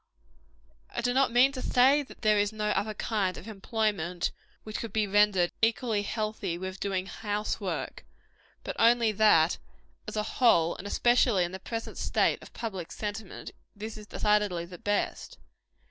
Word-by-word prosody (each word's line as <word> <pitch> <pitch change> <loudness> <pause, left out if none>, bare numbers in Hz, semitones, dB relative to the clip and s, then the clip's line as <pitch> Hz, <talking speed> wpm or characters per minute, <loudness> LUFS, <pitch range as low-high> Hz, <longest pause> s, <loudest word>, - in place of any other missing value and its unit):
I - - -4
do 245 +1 +1
not 265 -1 +3
mean 250 +3 +5
to 260 -2 -6
say, 265 +5 +4
that 275 - -13
there 215 -1 +4
is 205 0 +1
no 210 -1 -2
other 210 +1 -1
kind 195 -4 -1
of 195 - -10
employment 200 -5 -1 0.3
which 215 0 -5
could 230 - -5
be 215 0 +1
rendered 200 -3 +3
equally 225 -1 +1
healthy 215 -4 -3
with 190 +1 -6
doing 190 -2 -1
house 210 +1 -3
work; - - -4 0.6
but - - -5
only 235 -1 +5
that, 195 -6 +4 0.5
as - - -5
a 210 - 0
whole, 190 -9 +3
and 200 - -8
especially 240 -3 +3
in 175 - -3
the 190 - -6
present 225 +4 -6
state - - +1
of - - -13
public 190 -7 -6
sentiment, 210 -1 -6 0.2
this 215 +2 -7
is 210 -1 -11
decidedly 210 -6 +1
the 175 0 -11
best. 205 0 -2
210 Hz, 165 wpm, -29 LUFS, 190-225 Hz, 0.6 s, mean